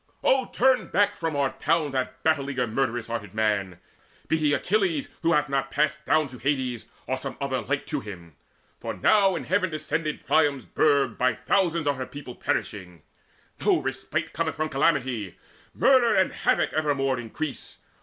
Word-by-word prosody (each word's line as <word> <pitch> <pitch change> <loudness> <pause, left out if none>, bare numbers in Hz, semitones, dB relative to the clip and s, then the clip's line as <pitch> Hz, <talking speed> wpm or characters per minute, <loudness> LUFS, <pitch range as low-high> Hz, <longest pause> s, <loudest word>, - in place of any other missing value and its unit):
Oh 260 -1 +3
turn 260 +1 +2
back 205 0 +2
from 160 -2 -3
our 140 -1 0
town 155 -4 0
That 130 -1 -3
battle 150 -3 +1
eager 130 -3 0
murderous 120 0 -1
hearted 115 -4 -5
man, 100 -5 0 0.5
Be 160 - +2
he 150 -2 +2
Achilles 180 -2 0
who 170 0 +2
hath 150 -1 +2
not 135 0 -1
passed 150 +1 0
down 155 0 +3
To 125 -1 -11
Hades, 130 -2 -1 0.2
or 130 - -1
some 130 - -6
other 135 -2 -1
like 145 0 -2
to 150 - -2
him. 85 - -10 0.4
For - - -5
now 195 -3 +4
in - - -4
heaven 185 0 +1
descended 155 0 -3
Priam's 145 -2 +2
burg 145 -3 +2
By 125 -2 +2
thousands 165 - +1
are 145 - +2
her 130 -1 -5
people 140 -3 -9
perishing: 90 -11 -4 0.6
No - - +4
respite - - -3
cometh - - -1
from 155 +1 -2
calamity: 130 - 0 0.4
Murder 255 -4 +4
and 190 - +3
havoc - - +1
evermore 140 -4 0
increase. 135 +5 -6
140 Hz, 170 wpm, -26 LUFS, 125-155 Hz, 0.6 s, now